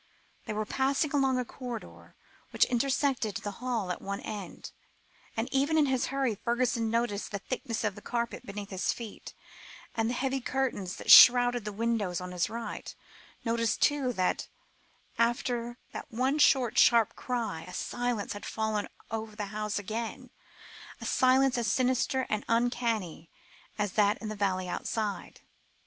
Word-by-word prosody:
They -, -, -2 dB
were 215 Hz, 0 st, -2 dB
passing 275 Hz, +5 st, 0 dB
along 270 Hz, -3 st, +2 dB
a 250 Hz, -, -1 dB
corridor, 245 Hz, -2 st, -8 dB, 0.3 s
which -, -, +3 dB
intersected 255 Hz, -3 st, 0 dB
the 205 Hz, -, -5 dB
hall 235 Hz, -7 st, -1 dB
at 180 Hz, -, -5 dB
one 200 Hz, 0 st, -4 dB
end, 205 Hz, -5 st, -7 dB, 0.7 s
and 225 Hz, +2 st, 0 dB
even 280 Hz, +4 st, +2 dB
in 305 Hz, -, +5 dB
his 260 Hz, -2 st, 0 dB
hurry 270 Hz, -4 st, 0 dB
Fergusson 235 Hz, +1 st, 0 dB
noticed 230 Hz, -3 st, -1 dB
the 200 Hz, -, -3 dB
thickness 230 Hz, +2 st, -4 dB
of 210 Hz, -2 st, 0 dB
the -, -, -11 dB
carpet 235 Hz, 0 st, -3 dB
beneath 205 Hz, -2 st, -7 dB
his 190 Hz, -1 st, 0 dB
feet, 225 Hz, -4 st, -8 dB, 0.6 s
and 225 Hz, 0 st, 0 dB
the 245 Hz, -, -1 dB
heavy 270 Hz, +1 st, -1 dB
curtains 245 Hz, -8 st, -2 dB
that -, -, 0 dB
shrouded 245 Hz, -2 st, +9 dB
the 210 Hz, -, -3 dB
windows 215 Hz, -4 st, -1 dB
on 180 Hz, 0 st, -6 dB
his 180 Hz, -2 st, 0 dB
right; 230 Hz, 0 st, -6 dB, 0.5 s
noticed, 230 Hz, -1 st, +1 dB
too, 285 Hz, -3 st, +2 dB
that 185 Hz, -4 st, 0 dB, 0.7 s
after 240 Hz, 0 st, 0 dB, 0.2 s
that -, -, -7 dB
one 260 Hz, +6 st, 0 dB
short 260 Hz, -5 st, +4 dB
sharp 230 Hz, -3 st, +5 dB
cry, 230 Hz, -10 st, -3 dB
a 180 Hz, -, -9 dB
silence 245 Hz, -4 st, -2 dB
had 205 Hz, -, -8 dB
fallen 220 Hz, -2 st, -2 dB, 0.2 s
over 220 Hz, -1 st, -4 dB
the 210 Hz, -1 st, -3 dB
house 210 Hz, 0 st, -2 dB
again 220 Hz, +3 st, -5 dB, 0.7 s
a -, -, -7 dB
silence 260 Hz, 0 st, +3 dB
as 235 Hz, -, -1 dB
sinister 260 Hz, +1 st, +1 dB
and 215 Hz, 0 st, -1 dB
uncanny 230 Hz, -8 st, 0 dB, 0.5 s
as 205 Hz, -2 st, 0 dB
that 205 Hz, 0 st, +3 dB
in 215 Hz, -, -6 dB
the 215 Hz, -, -4 dB
valley 185 Hz, -2 st, 0 dB
outside. 205 Hz, +3 st, -3 dB
230 Hz, 160 wpm, -29 LUFS, 210-255 Hz, 0.7 s, shrouded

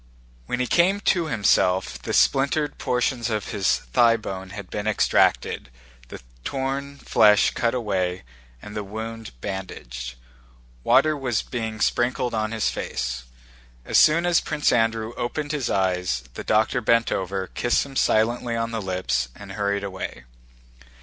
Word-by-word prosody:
When 125 Hz, -, -2 dB
he 125 Hz, -, +1 dB
came 180 Hz, +8 st, +3 dB
to 175 Hz, -4 st, +2 dB
himself 95 Hz, -6 st, +1 dB
the -, -, -4 dB
splintered 140 Hz, +2 st, +2 dB
portions 125 Hz, -1 st, 0 dB
of 110 Hz, -3 st, -2 dB
his 100 Hz, -3 st, +1 dB, 0.2 s
thighbone 110 Hz, -5 st, +2 dB
had 100 Hz, -1 st, -9 dB
been 105 Hz, +1 st, -3 dB
extracted, 105 Hz, -10 st, +2 dB, 0.4 s
the -, -, -10 dB, 0.2 s
torn 140 Hz, +1 st, -3 dB
flesh 105 Hz, -6 st, +4 dB
cut 115 Hz, +1 st, 0 dB
away, 95 Hz, -, -1 dB, 0.4 s
and 105 Hz, -, -9 dB
the 105 Hz, -, -3 dB
wound 110 Hz, -, -7 dB
bandaged. 65 Hz, -11 st, -6 dB, 0.7 s
Water 155 Hz, 0 st, +4 dB
was 125 Hz, -6 st, -1 dB
being 110 Hz, -3 st, -4 dB
sprinkled 120 Hz, +1 st, +1 dB
on 110 Hz, -1 st, 0 dB
his 115 Hz, -1 st, 0 dB
face. 60 Hz, -1 st, -4 dB, 0.6 s
As -, -, +4 dB
soon 165 Hz, +3 st, +5 dB
as 175 Hz, -1 st, +3 dB
Prince 150 Hz, -1 st, 0 dB
Andrew 115 Hz, -1 st, +1 dB
opened 145 Hz, +5 st, -3 dB
his 145 Hz, -5 st, -2 dB
eyes, 90 Hz, -9 st, 0 dB
the -, -, -6 dB
doctor 110 Hz, +4 st, +2 dB
bent 115 Hz, +1 st, +3 dB
over, 95 Hz, 0 st, -2 dB
kissed 120 Hz, +7 st, 0 dB
him 135 Hz, -1 st, -11 dB
silently 120 Hz, +1 st, +1 dB
on 115 Hz, 0 st, -2 dB
the 115 Hz, -1 st, -3 dB
lips, 90 Hz, -10 st, -1 dB
and 100 Hz, -1 st, -10 dB
hurried 100 Hz, +1 st, -1 dB
away. 95 Hz, -10 st, -6 dB
110 Hz, 145 wpm, -24 LUFS, 95-125 Hz, 0.7 s, soon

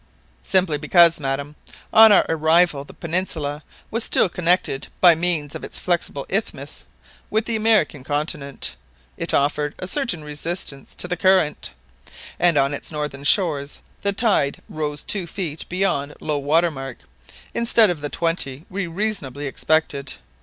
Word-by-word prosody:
"Simply 180 Hz, -6 st, +1 dB
because, 165 Hz, +2 st, +5 dB
madam, 140 Hz, +1 st, -3 dB, 0.4 s
on 220 Hz, 0 st, +9 dB
our 205 Hz, -, +6 dB
arrival 160 Hz, -2 st, +2 dB
the -, -, -13 dB
peninsula 160 Hz, -4 st, -2 dB, 0.3 s
was 230 Hz, +1 st, 0 dB
still 190 Hz, -, +3 dB
connected 175 Hz, -5 st, +1 dB
by 175 Hz, -2 st, +8 dB
means 160 Hz, -3 st, -1 dB
of -, -, -7 dB
its -, -, -7 dB
flexible 170 Hz, -5 st, -2 dB
isthmus 200 Hz, +4 st, -4 dB, 0.4 s
with 220 Hz, +1 st, 0 dB
the 230 Hz, -, -1 dB
American 215 Hz, -10 st, +2 dB
continent. 145 Hz, 0 st, -2 dB, 0.4 s
It -, -, -3 dB
offered 145 Hz, +1 st, 0 dB
a -, -, -5 dB
certain 230 Hz, -, +1 dB
resistance 150 Hz, -1 st, -4 dB
to -, -, -2 dB
the 180 Hz, -, -1 dB
current, 185 Hz, -5 st, +2 dB, 0.7 s
and 175 Hz, -3 st, +4 dB
on 140 Hz, +1 st, +2 dB
its 145 Hz, -, -6 dB
northern 150 Hz, -2 st, -4 dB
shores 145 Hz, -6 st, +1 dB, 0.2 s
the 200 Hz, -, +1 dB
tide 200 Hz, -9 st, +1 dB
rose 150 Hz, -2 st, -4 dB
two 190 Hz, -4 st, 0 dB
feet 165 Hz, -4 st, -5 dB
beyond 170 Hz, -6 st, -1 dB
low 150 Hz, -2 st, -2 dB
water 160 Hz, +5 st, +2 dB
mark, 135 Hz, -3 st, -7 dB, 0.6 s
instead 230 Hz, -3 st, +4 dB
of 160 Hz, -4 st, -5 dB
the 145 Hz, -, -3 dB
twenty 165 Hz, -4 st, -2 dB
we 195 Hz, -1 st, -3 dB
reasonably 165 Hz, -7 st, -3 dB
expected. 140 Hz, -1 st, 0 dB
160 Hz, 145 wpm, -22 LUFS, 145-185 Hz, 0.7 s, on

